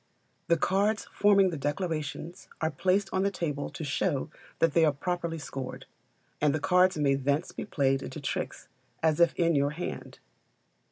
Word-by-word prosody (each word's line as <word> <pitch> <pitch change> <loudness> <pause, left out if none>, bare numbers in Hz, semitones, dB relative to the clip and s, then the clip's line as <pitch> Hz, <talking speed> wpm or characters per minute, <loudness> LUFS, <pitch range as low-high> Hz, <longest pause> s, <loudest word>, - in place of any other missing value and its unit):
The 170 - +4
cards 205 +6 +1
forming 200 -2 +4
the 160 - -4
declarations 155 +2 -3
are 160 0 0
placed 185 +6 +1
on 190 - +2
the 200 - +2
table 150 -7 -3
to - - -7
show 145 0 -1 0.3
that 165 -3 +2
they 165 - +4
are 155 - +5
properly 170 +2 -3
scored, 135 -4 -6 0.6
and 150 0 +3
the - - -1
cards 180 +3 +3
may 140 -2 +3
thence 140 +4 0
be - - -6
played 135 -8 +1
into 135 - -6
tricks 140 - -4 0.4
as 160 -1 +3
if 170 - +4
in 170 -1 +2
your 140 -1 +2
hand. 160 +4 -6
160 Hz, 170 wpm, -29 LUFS, 145-180 Hz, 0.6 s, are